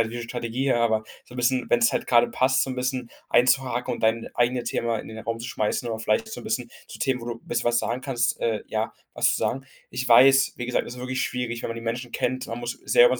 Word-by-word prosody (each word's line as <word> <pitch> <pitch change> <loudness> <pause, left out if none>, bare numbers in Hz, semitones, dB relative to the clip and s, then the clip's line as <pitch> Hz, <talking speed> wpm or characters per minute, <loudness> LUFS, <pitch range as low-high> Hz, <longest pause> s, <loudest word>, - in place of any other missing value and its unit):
halt 115 - +2
wie 120 - -6
'ne 120 - -4
Strategie, 120 +3 -1
aber 110 -2 +2 0.2
so 125 - -14
'n - - -8
bisschen 125 +1 +1
wenn's 120 -1 +4
halt - - -1
grade 120 -1 +4
passt, 130 0 +2
so 135 - -2
'n - - -3
bisschen 125 -1 -2 0.2
einzuhaken 125 0 +2
und - - -5
dein 115 0 +1
eigene 120 +1 +1
Thema 115 -1 -1
in - - -8
den 110 0 -8
Raum 115 +1 -3
zu 120 - -5
schmeißen 110 +1 -1
oder 110 - -3
vielleicht 220 - 0
auch 220 - -9
so - - -6
'n - - -13
bisschen 120 -2 -2 0.2
zu - - -10
Themen, 130 -2 +1
wo 115 - -8
du 120 - -2
'n 115 - -17
bisschen 120 0 -1
was 120 0 +3
sagen 120 +2 -2
kannst 125 -3 -1
äh, 110 -2 0
ja, 110 +1 -2 0.2
was - - +2
zu - - 0
sagen. 135 +1 -2 0.2
Ich 125 0 -3
weiß, 135 +3 +7
wie 120 - -4
gesagt, 125 - 0
es 120 - -7
ist 125 - -9
wirklich 130 +1 -2
schwierig, 120 -2 -2
wenn - - -3
man 115 - -4
die 115 - -6
Menschen 120 +1 -4
kennt. 130 +1 -1
Man 115 +1 -5
muss 120 0 -4
selber - - +6
120 Hz, 275 wpm, -25 LUFS, 115-130 Hz, 0.2 s, weiß